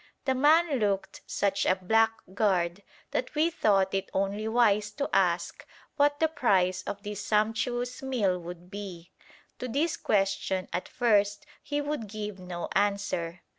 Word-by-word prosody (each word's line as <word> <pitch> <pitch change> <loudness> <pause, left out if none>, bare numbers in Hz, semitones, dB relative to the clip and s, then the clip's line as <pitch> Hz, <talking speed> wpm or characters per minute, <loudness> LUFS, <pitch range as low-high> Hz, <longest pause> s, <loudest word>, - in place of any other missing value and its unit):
The 265 - +2
man 300 +2 +4
looked 200 -2 -1
such 200 -1 0
a 185 - +3
blackguard 195 -3 +1 0.3
that - - -2
we 320 +3 +3
thought 195 - +2
it 195 -1 -1
only 200 +3 -1
wise 215 -3 +3
to 280 +5 -2
ask - - +1 0.3
what 290 0 +3
the 320 - +4
price 190 - +2
of 200 0 -5
this 205 -1 -5
sumptuous 240 +3 0
meal 220 -9 0
would 175 +1 -10
be. 190 -4 -8 0.5
To 250 - -3
this 305 +7 0
question 195 -2 0
at 180 - -2
first 205 0 +2 0.2
he 290 0 -2
would 290 -6 -3
give 210 -1 -6
no 180 -1 -5
answer. 200 -4 -1
205 Hz, 145 wpm, -28 LUFS, 190-245 Hz, 0.5 s, man